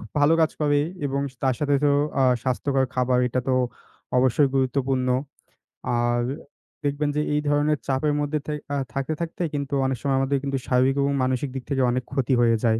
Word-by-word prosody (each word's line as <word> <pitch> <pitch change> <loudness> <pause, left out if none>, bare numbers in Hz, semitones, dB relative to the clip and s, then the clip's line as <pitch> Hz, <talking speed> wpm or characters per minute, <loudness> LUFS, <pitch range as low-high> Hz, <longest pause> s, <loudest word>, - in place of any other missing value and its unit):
খুব 110 - -11
ভালো 150 +3 +5
কাজ 160 -1 +3
করে 145 -1 +3 0.3
এবং 140 0 -1 0.2
তার 130 -1 +2
সাথে 145 -1 +2
তো - - +5 0.3
আ - - +5 0.2
স্বাস্থ্যকর 135 +1 0
খাবার 125 0 +2
এটা 130 +1 -1
তো - - +2 0.7
অবশ্যই 130 +2 +3
গুরুত্বপূর্ণ। 130 -1 +1 0.9
আর 120 0 +1 0.6
দেখবেন 145 +1 0
যে 150 - +2
এই 150 - +1
ধরনের 145 +1 +2
চাপের 140 +2 +1
মধ্যে 145 +1 -1
থেই 150 -1 -3
আ - - 0 0.2
থাকতে, 135 +3 -2
থাকতেই 170 0 -3
কিন্তু 140 -1 -3
অনেক 130 -1 0
সময় 135 -1 +1
আমাদের 135 +1 +1
কিন্তু 140 -1 -1
স্বাভাবিক 130 +2 +3
এবং 140 0 +1
মানসিক 130 +2 0
দিক 130 - -4
থেকে 135 -2 +1
অনেক 125 +1 -1
ক্ষতি 135 -2 0
হয়ে 115 -1 +4
যায়। 110 0 +3
135 Hz, 190 wpm, -24 LUFS, 130-145 Hz, 0.9 s, ভালো